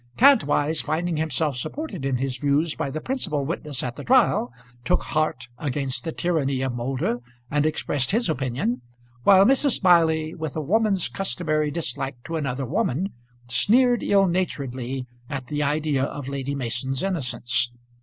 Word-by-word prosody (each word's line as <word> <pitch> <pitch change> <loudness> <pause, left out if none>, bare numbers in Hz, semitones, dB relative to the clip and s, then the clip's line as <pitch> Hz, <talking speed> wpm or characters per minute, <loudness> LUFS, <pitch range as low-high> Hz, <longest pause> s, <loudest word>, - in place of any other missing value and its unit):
Kantwise 160 - +4
finding 165 +1 -1
himself 155 -2 0
supported 195 - -4
in 135 -1 +1
his 130 0 -2
views 145 +4 +1
by 155 -3 -3
the 150 +3 -4
principal 180 - -1
witness 150 -3 -4
at 125 -1 -4
the - - -6
trial 240 - +3 0.3
took 180 +8 +1
heart 155 -6 -1
against 135 -3 -1
the 165 - -3
tyranny 145 -7 0
of 130 -2 -1
Moulder 120 0 -1 0.3
and 150 +1 +2
expressed 145 -3 0
his 230 +4 +2
opinion, 125 -4 -1 0.4
while 195 0 +7
Mrs. 270 +1 +4
Smiley, 160 -4 +3
with 160 -4 -5
a - - -1
woman's 200 +3 +1
customary 155 -6 -1
dislike 140 -4 -2
to 165 - -5
another 135 -3 -2
woman, 150 +9 0 0.4
sneered 240 - +3
ill 195 -1 +4
naturedly 135 -8 -2 0.2
at 135 -3 -4
the 145 +3 -2
idea 145 -1 +1
of 140 -1 -6
Lady 140 0 -3
Mason's 130 +1 -2
innocence. 125 -8 -1
150 Hz, 155 wpm, -24 LUFS, 135-175 Hz, 0.4 s, while